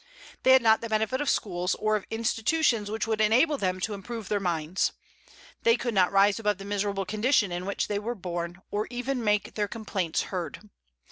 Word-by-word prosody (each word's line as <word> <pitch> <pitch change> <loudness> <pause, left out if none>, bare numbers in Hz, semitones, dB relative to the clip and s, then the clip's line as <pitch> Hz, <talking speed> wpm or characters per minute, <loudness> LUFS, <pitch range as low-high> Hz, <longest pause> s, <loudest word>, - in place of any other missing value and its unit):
They 260 - +6
had 260 -2 +6
not 220 -1 +5
the 230 - -5
benefit 220 +5 0
of 290 - 0
schools, 180 -2 0
or 215 0 +1
of 210 - -3
institutions 225 +1 +1
which 220 0 -2
would 220 -1 0
enable 255 +8 +3
them 185 -1 -1
to 215 - -1
improve 215 +1 -7
their 205 - +1
minds. 170 -2 -1 0.7
They 230 +1 +4
could 240 -1 -2
not 185 -3 +3
rise 200 +2 +4
above 210 -3 0
the 195 - -9
miserable 200 -1 -1
condition 215 0 +2
in 175 +2 -4
which 200 - -1
they 205 -1 -1
were 235 +4 -3
born, 175 -1 -5
or 210 +1 -1
even 245 +1 -3
make 210 -1 +1
their 210 -1 -1
complaints 200 -6 -2
heard. 185 +3 -5
210 Hz, 200 wpm, -27 LUFS, 195-230 Hz, 0.7 s, They